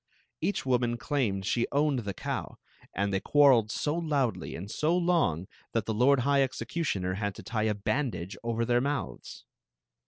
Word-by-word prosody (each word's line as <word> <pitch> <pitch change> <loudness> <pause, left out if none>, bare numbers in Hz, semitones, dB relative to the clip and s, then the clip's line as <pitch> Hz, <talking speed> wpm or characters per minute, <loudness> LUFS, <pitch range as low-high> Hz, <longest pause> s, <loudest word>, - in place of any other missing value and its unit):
Each 205 - 0
woni»i 120 -2 +1
clahned 115 -8 -1
she 120 +4 +1
owned 145 -2 +2
the 100 -4 -4
cow, - - -4 0.3
and 100 0 -1
they 95 - +2
quar 145 +5 +5
reled 115 -4 +3
so 145 +6 -1
loudly 140 - -1
and 95 +4 -6
so 165 +4 +1
long 165 - +1 0.3
that 115 -3 0
the 110 - -1
lord 125 +4 +4
high 140 +2 +3
execu 130 +3 -1
tioner 90 - -1
had 100 -2 -2
to - - -10
tie 110 -1 -1
a 105 - 0
bsMfidage 105 - -2
over 115 0 0
thek 120 +1 +2
mouths. 140 +1 -4
120 Hz, 180 wpm, -29 LUFS, 100-140 Hz, 0.3 s, quar